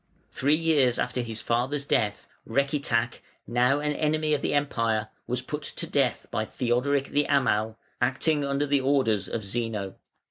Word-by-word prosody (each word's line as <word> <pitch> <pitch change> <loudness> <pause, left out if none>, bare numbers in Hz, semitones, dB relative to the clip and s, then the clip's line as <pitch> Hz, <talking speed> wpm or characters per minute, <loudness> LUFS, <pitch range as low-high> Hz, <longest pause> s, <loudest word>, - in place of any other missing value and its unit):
] - - -37
Three 145 +3 +2
years 155 -7 +3
after 125 0 -1
his 115 -2 -4
father's 130 +6 0
death 105 -6 0 0.2
(484), - - -17
Recitach, 135 -4 +1 0.3
now 125 +4 +2
an 150 0 0
enemy 155 +1 +1
of 145 - +1
the - - 0
Empire, 115 -6 0 0.2
was 125 +1 -2
put 150 +3 -4
to 145 - -4
death - - 0
by - - 0
Theodoric 130 +3 0
the 145 0 +2
Amal, 110 -6 +2 0.2
acting 140 +4 +1
under 140 +1 0
the 140 -1 +2
orders 130 -7 +2
of 110 - -3
Zeno. 105 -2 -3
130 Hz, 170 wpm, -27 LUFS, 115-145 Hz, 0.3 s, years